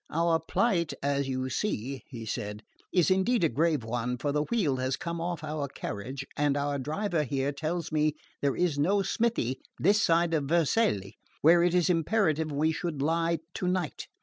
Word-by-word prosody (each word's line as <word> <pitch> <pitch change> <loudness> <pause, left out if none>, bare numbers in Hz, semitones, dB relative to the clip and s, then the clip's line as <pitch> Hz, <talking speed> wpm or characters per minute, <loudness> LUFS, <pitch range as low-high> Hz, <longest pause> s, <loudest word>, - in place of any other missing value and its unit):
"Our 165 0 +2
plight, 170 0 +1
as 140 -1 +1
you 130 0 -1
see," 135 - -2
he 115 -4 -8
said, 105 0 -4 0.3
"is 180 0 +3
indeed 190 +4 +2
a 165 - +4
grave 155 -4 +1
one; 120 +2 -2
for 145 +4 -1
the 150 +1 0
wheel 180 - +1
has 130 +1 -1
come 170 -1 -4
off 170 -2 -3
our 150 -2 -3
carriage 130 +2 -6
and 145 -1 +2
my 145 0 -1
driver 165 +5 -1
here 140 0 -1
tells 160 +4 -3
me 155 -1 +2 0.3
there 140 -1 +1
is 170 -5 0
no 195 +7 +3
smithy 195 - 0 0.2
this 205 +4 +3
side 170 -1 +3
Vercelli, 155 - +1 0.2
where 170 +3 +6
it 175 0 +2
is 175 -2 +3
imperative 165 -3 +1
we 150 +3 +1
should 160 -2 -3
lie 165 +1 +1
tonight. 180 -4 -2
155 Hz, 175 wpm, -29 LUFS, 140-175 Hz, 0.3 s, where